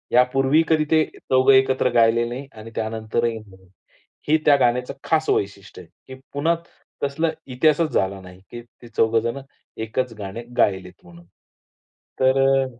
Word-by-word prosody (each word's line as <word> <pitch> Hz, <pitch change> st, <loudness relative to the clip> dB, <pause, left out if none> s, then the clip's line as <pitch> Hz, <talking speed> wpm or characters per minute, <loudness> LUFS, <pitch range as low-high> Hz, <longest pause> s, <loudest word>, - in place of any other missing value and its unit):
यापूर्वी 135 Hz, +5 st, +3 dB
कधी 155 Hz, -1 st, +3 dB
ते 155 Hz, -1 st, +5 dB
चौघं 130 Hz, +1 st, +3 dB
एकत्र 130 Hz, -1 st, +3 dB
गायले 115 Hz, 0 st, +3 dB
नाही 130 Hz, +3 st, -7 dB
आणि 110 Hz, +1 st, -11 dB
त्यानंतरही 110 Hz, +1 st, -2 dB
नाही. 95 Hz, -3 st, -18 dB, 0.6 s
हे 155 Hz, -, +5 dB
त्या 145 Hz, -, +6 dB
गाण्याचं 125 Hz, -1 st, 0 dB
खास 160 Hz, -1 st, 0 dB
वैशिष्ट्य 100 Hz, -1 st, -2 dB
आहे 90 Hz, +9 st, -15 dB
की 130 Hz, -, -19 dB
पुन्हा 155 Hz, +4 st, +1 dB, 0.5 s
तसला 160 Hz, +4 st, 0 dB, 0.2 s
इतिहासच 155 Hz, +5 st, +1 dB
झाला 95 Hz, +1 st, 0 dB
नाही 90 Hz, 0 st, -14 dB
की 120 Hz, -, -7 dB, 0.2 s
ते 120 Hz, -, -12 dB
चौघ 115 Hz, 0 st, +1 dB
जण 115 Hz, +4 st, -1 dB, 0.4 s
एकच 115 Hz, +2 st, -3 dB
गाणे 100 Hz, +4 st, -6 dB
गायलेत 95 Hz, -2 st, +1 dB
म्हणून. 85 Hz, 0 st, -16 dB, 0.9 s
तर 130 Hz, +1 st, +3 dB
अ 135 Hz, 0 st, +3 dB
120 Hz, 150 wpm, -22 LUFS, 110-135 Hz, 0.9 s, त्या